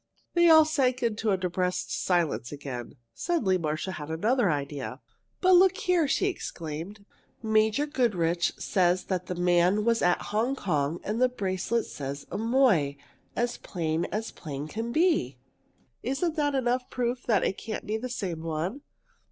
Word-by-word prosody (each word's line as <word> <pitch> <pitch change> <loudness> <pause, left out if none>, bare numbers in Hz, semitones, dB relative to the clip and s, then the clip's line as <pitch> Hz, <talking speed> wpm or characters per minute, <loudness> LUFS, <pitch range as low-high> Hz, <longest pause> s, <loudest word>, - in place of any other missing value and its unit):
They 345 -1 +5
all 315 -1 +8
sank 265 -5 +1
into 225 -1 0
a 195 - +3
depressed 180 0 -1
silence 170 -9 0
again. 140 -4 -6 0.2
Suddenly 190 - 0
Marcia 155 +3 -2
had 150 -4 -7
another 210 +7 +2
idea. 140 -3 -3 0.4
"But 370 - +4
look 365 +1 +6
here!" 350 -4 +2
she 275 - +1
exclaimed. 180 - -5 0.4
"Major 220 +5 +2
Goodrich 180 - +1
says 180 -2 +1
that 185 -2 -3
man 180 +4 +3
was 230 -1 +2
at 180 0 +3
Hong 235 +6 +1
Kong 155 - -1
and 220 +4 -2
the 255 - +5
bracelet 205 0 -1
says 140 0 -6
'Amoy,' 220 - +2 0.4
as 240 0 -1
plain 165 -2 -2
as 220 +2 -4
plain 145 -2 -6
can 225 +7 -4
be. 310 - +2 0.6
Isn't 280 +7 -1
that 290 -3 +1
enough 250 -1 0
proof 245 0 -2
that 215 -5 +3
it 190 - -1
can't 220 -1 -5
be 215 +1 -1
the 255 +3 -5
same 190 -10 -4
one?" 165 - -3
205 Hz, 150 wpm, -28 LUFS, 165-250 Hz, 0.6 s, all